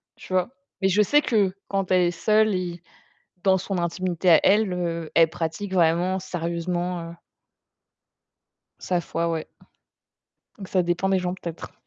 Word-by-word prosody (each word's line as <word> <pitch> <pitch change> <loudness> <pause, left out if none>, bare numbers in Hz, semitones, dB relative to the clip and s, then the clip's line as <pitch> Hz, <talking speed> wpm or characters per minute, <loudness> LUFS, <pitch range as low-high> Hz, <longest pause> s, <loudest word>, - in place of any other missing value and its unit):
tu - - -10
vois? 185 +3 +1 0.3
Mais 190 - +3
je 205 +3 +3
sais 295 +8 +4
que 205 -8 +1
quand 195 -2 -2
elle 185 -1 +4
est 175 - +2
seule 215 +4 +2
et 175 -2 -4 0.6
dans 190 -1 +4
son 190 +1 -3
intimité 175 +1 -1
à 160 - +8
elle, 205 -1 +3
heu, 170 -2 -3
elle 165 -1 +6
pratique 170 +4 -4
vraiment 175 +2 +2
sérieusement, 175 0 -3
heu 170 - -12 1.6
sa 180 -1 -1
foi, 165 0 -2
ouais. 165 -2 -3 1.1
Donc 195 -2 -8
ça 185 -2 +1
dépend 175 +3 0
des 190 - +2
gens, 180 0 -2
peut-être. 170 -3 -8
180 Hz, 155 wpm, -24 LUFS, 170-190 Hz, 1.6 s, à